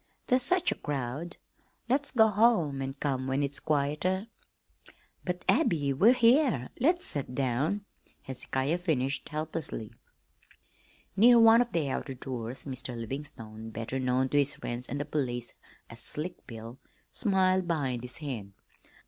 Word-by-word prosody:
"There's 255 +1 +3
such 360 +7 +3
a - - -5
crowd. 145 +3 -4 0.5
Let's 280 +4 +2
go 220 -3 +5
home 200 - +3
an' 135 0 -3
come 135 -2 -2
when 135 +2 0
it's 140 0 -1
quieter." 155 +8 0 0.9
"But, 180 -1 -4
Abby, 145 -4 +2
we 210 - +6
here, 240 - +3
let's 345 +8 +2
set 135 -3 -4
down," 140 +10 0 0.4
Hezekiah 130 +4 -2
finished 135 -6 -1
helplessly. 155 -7 -4 1.2
Near 235 +4 +7
one 225 +1 +7
of 240 - -1
the 160 -4 0
outer 135 0 -4
doors 125 -1 -6
Mr. 130 -3 -4
Livingstone 115 -3 -6
better 115 +4 -4
known 130 +1 +1
to 145 - +3
his 140 0 +3
friends 120 +1 -5
and 140 - -3
the 145 - -2
police 125 -5 -2 0.3
as 115 - -10
"Slick 155 +8 -4
Bill" 115 +2 -9 0.3
smiled 190 -3 +2
behind 135 -8 -1
his 125 0 -6
hand. 115 -10 -6
145 Hz, 140 wpm, -29 LUFS, 130-185 Hz, 1.2 s, Near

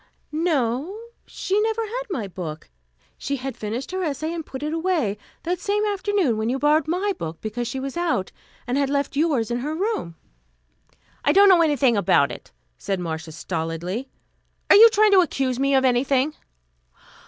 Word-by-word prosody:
"No; 305 - -1 0.3
she 400 +2 -1
never 445 +1 0
had - - -4
my 235 - -3
book. 160 - -7 0.5
She 280 - -2
had 265 0 -5
finished 225 +7 -5
her 375 0 -2
essay 310 +1 -2
and 335 -1 -4
put 265 -1 -8
it 305 +1 -2
away, 325 - 0 0.3
that 350 +1 -1
same 415 +2 0
afternoon, 400 - 0
when 220 +1 -1
you 260 - 0
borrowed 300 +3 +2
my 375 +5 0
book 160 0 -5
because 230 +2 -4
she 265 +3 -4
was 270 0 -5
out, 335 - -1 0.3
and 250 +3 0
had 280 -1 +1
left 280 0 -1
yours 280 -7 +1
in 240 - -1
her 300 +5 -3
room." 375 - -2 1.1
"I 290 - +4
don't 400 +4 +7
know 360 -3 +6
anything 280 -6 +3
about 200 - +3
it," - - -10 0.3
said 195 -2 -2
Marcia 160 -2 -5
stolidly. 170 - -4 0.6
"Are - - +9
you 450 +3 +10
trying 430 -1 +4
to 385 -2 +7
accuse 265 -7 -1
me 275 0 +2
of 265 0 +3
anything?" 260 +3 +2
280 Hz, 175 wpm, -23 LUFS, 235-355 Hz, 1.1 s, you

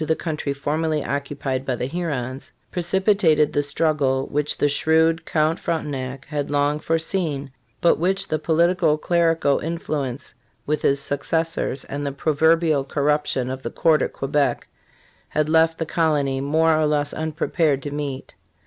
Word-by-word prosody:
the 160 +1 +1
country 155 -4 -3
formerly 150 +2 -1
occupied 140 -2 -3
by 130 -2 -1
the 120 - -3
Hurons 135 -5 -4 0.2
precipitated 180 -4 +2
the 145 - +2
struggle 140 -2 0
which 150 0 -1
the 145 - +2
shrewd 160 +3 +2
Count 155 +1 +1
Frontenac 135 -5 -3
had 145 -2 -3
long 145 +1 +1
foreseen, 160 -3 -1 0.3
but 170 - +4
which 195 +3 +1
the 155 - -1
politi 170 +3 +2
co 155 -3 +3
clerical 165 -3 +2
influence 150 -5 -4 0.3
with 150 +1 -1
his 140 0 +2
successors 145 +1 -1
and 145 +1 -5
the 140 - -2
proverbial 155 +1 +2
corruption 145 -2 0
of 130 0 -5
the - - -4
court 160 -2 +2
at - - -1
Quebec 140 +1 -1 0.6
had 155 0 0
left 160 +1 +3
the 165 - -2
colony 145 -5 0
more 160 +3 +3
or 155 -1 +2
less 145 -1 0
unprepared 155 -2 0
to 145 - -4
meet. 140 -2 -5
150 Hz, 150 wpm, -22 LUFS, 140-160 Hz, 0.6 s, but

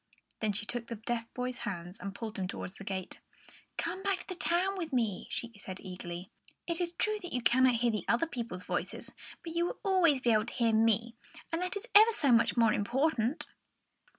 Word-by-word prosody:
Then 215 -1 +1
she 205 +1 -1
took 235 +1 -3
the 235 - -4
deaf 230 +1 -3
boy's 250 0 -2
hands 175 +2 -5
and 200 -1 -6
pulled 220 -2 -5
him 185 - -1
towards 185 +1 -6
the - - -9
gate. 190 -1 -4 0.6
"Come 355 +3 -2
back 395 -1 +1
to - - -15
the 370 - -3
town 360 +3 +1
with 335 -5 -4
me," 225 -7 0
she 240 - -4
said 185 -2 -6
eagerly. 180 -1 -7 0.3
"It 340 0 0
is 345 -1 -1
true 430 +3 0
that 355 - -6
you 250 -1 -1
cannot 255 +1 +5
hear 235 0 +2
the 215 - -3
other 235 +8 +3
people's 230 - -5
voices; - - -3 0.3
but 330 - -5
you 340 - +2
will 360 - -4
always 365 -8 +4
be 245 -2 +2
able 215 -1 +3
to - - -5
hear 230 -3 +2
me, 225 +1 +3 0.4
and 330 +1 -1
that 365 +2 -1
is 405 - -7
ever 435 +2 +9
so 280 -10 +2
much 230 +1 +4
more 225 -2 +5
important!" 250 +3 +1
240 Hz, 215 wpm, -32 LUFS, 215-335 Hz, 0.6 s, ever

